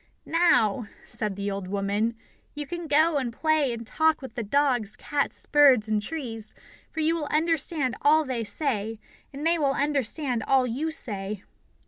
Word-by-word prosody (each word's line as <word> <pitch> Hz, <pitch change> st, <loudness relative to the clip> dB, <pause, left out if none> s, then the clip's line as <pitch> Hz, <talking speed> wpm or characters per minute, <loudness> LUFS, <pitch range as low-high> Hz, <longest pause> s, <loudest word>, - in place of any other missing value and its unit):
"Now," 245 Hz, -, +3 dB, 0.2 s
said 215 Hz, -3 st, -4 dB
the 200 Hz, +1 st, -3 dB
old 195 Hz, -1 st, -4 dB
woman, 200 Hz, +4 st, -1 dB, 0.4 s
"you 295 Hz, 0 st, -4 dB
can 345 Hz, +2 st, -6 dB
go 310 Hz, +1 st, +4 dB
and 255 Hz, -4 st, -1 dB
play 310 Hz, +1 st, +1 dB
and 230 Hz, 0 st, -6 dB
talk 315 Hz, +6 st, +2 dB
with 265 Hz, -4 st, -9 dB
the 245 Hz, -, -3 dB
dogs, 245 Hz, -2 st, +1 dB
cats, 290 Hz, -1 st, -1 dB
birds, 270 Hz, -7 st, +5 dB
and 215 Hz, -1 st, +1 dB
trees, 225 Hz, -5 st, -4 dB, 0.3 s
for 320 Hz, -, -4 dB
you 315 Hz, +1 st, +2 dB
will 310 Hz, -3 st, -3 dB
understand 310 Hz, -4 st, 0 dB
all 310 Hz, +2 st, +4 dB
they 250 Hz, -4 st, -2 dB
say, 220 Hz, -3 st, -2 dB, 0.3 s
and 285 Hz, +2 st, -6 dB
they 335 Hz, 0 st, +3 dB
will 280 Hz, -2 st, +2 dB
understand 275 Hz, -3 st, 0 dB
all 265 Hz, -1 st, +4 dB
you 265 Hz, +7 st, -2 dB
say." 205 Hz, -9 st, -5 dB
265 Hz, 165 wpm, -26 LUFS, 220-305 Hz, 0.4 s, birds